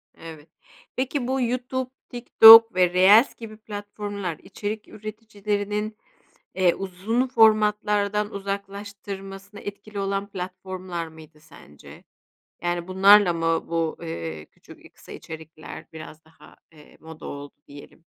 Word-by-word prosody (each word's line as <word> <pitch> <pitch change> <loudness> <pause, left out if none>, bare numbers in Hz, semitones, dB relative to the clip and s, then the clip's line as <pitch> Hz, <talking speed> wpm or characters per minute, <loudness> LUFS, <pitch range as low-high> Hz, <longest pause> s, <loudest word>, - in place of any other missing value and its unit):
Evet. 160 -1 -12 0.5
Peki, 260 0 -2
bu 265 0 -1
YouTube, 255 +1 -2 0.2
TikTok 225 -3 +8
ve 180 -1 +3
Reels 205 +7 +5
gibi 215 -2 -10
platformlar 205 -4 -6
içerik 210 +2 -6
üreticilerinin, 210 0 -5 0.6
eee, 185 -2 +2
uzun 195 +7 -2
formatlardan 210 -2 +2
uzaklaştırmasına 200 0 -7
etkili 205 0 -8
olan 195 0 -2
platformlar 185 -2 -6
mıydı 160 -1 -16
sence? 140 - -16 0.6
Yani, 175 0 -2
bunlarla 195 0 +6
mı 165 0 -1
bu, 165 -1 -2
eee, 80 - -6
küçük - - -18
i - - -14
kısa - - -17
içerikler 160 -1 -10
biraz 160 0 -11
daha, 160 - -19 0.2
eee, 150 -2 -19
moda 160 -1 -12
oldu 145 0 -8
diyelim? 145 +3 -15
200 Hz, 115 wpm, -24 LUFS, 170-210 Hz, 0.6 s, TikTok